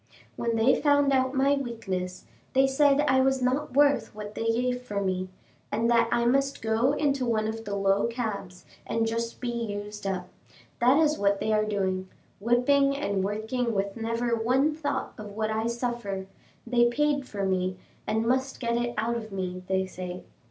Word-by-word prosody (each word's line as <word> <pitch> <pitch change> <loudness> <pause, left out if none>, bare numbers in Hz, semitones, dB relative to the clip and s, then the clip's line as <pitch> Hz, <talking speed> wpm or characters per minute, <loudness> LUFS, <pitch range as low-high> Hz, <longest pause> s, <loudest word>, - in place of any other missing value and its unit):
When 235 -1 -1
they 225 +4 +4
found 285 -1 +4
out 260 0 +2
my 275 +1 +3
weakness, 200 -9 -4 0.3
they 265 +1 +5
said 275 +1 +4
I 265 -3 +3
was 265 0 +2
not 255 +2 -1
worth 285 -5 +3
what 210 0 -7
they 225 - -4
gave 250 +2 0
for 210 -5 -3
me, 185 -1 -1 0.4
and 230 +3 +1
that 230 -1 +4
I 240 0 +2
must 275 +2 +1
go 225 +5 +2
into 280 -3 +1
one 220 -3 +1
of 225 +1 -5
the 200 0 -3
low 195 +1 +2
cabs, 210 -6 -5 0.2
and 225 0 0
just 230 +1 -3
be 245 - -3
used 210 -3 -4
up; 185 -2 -2 0.5
that 250 +4 +5
is 310 -1 +3
what 200 0 +2
they 220 - 0
are 215 0 +2
doing, 190 -3 -1 0.3
whipping 275 +5 +3
and 200 -9 -1
working 220 +4 -1
with 195 0 -1
never 230 +1 -1
one 260 +7 +2
thought 285 -3 -3
of 210 -1 -8
what 220 0 -1
I 220 +1 0
suffer 235 -5 -3 0.4
they 240 0 +3
paid 285 +1 0
for 200 -2 -3
me, 185 -1 0 0.3
and 220 +1 0
must 260 +2 0
get 235 -1 0
it 240 0 -2
out 230 +2 0
of 220 -2 -5
me, 185 -1 -4
they 190 0 +1
say. 185 -1 -7
230 Hz, 185 wpm, -27 LUFS, 205-260 Hz, 0.5 s, they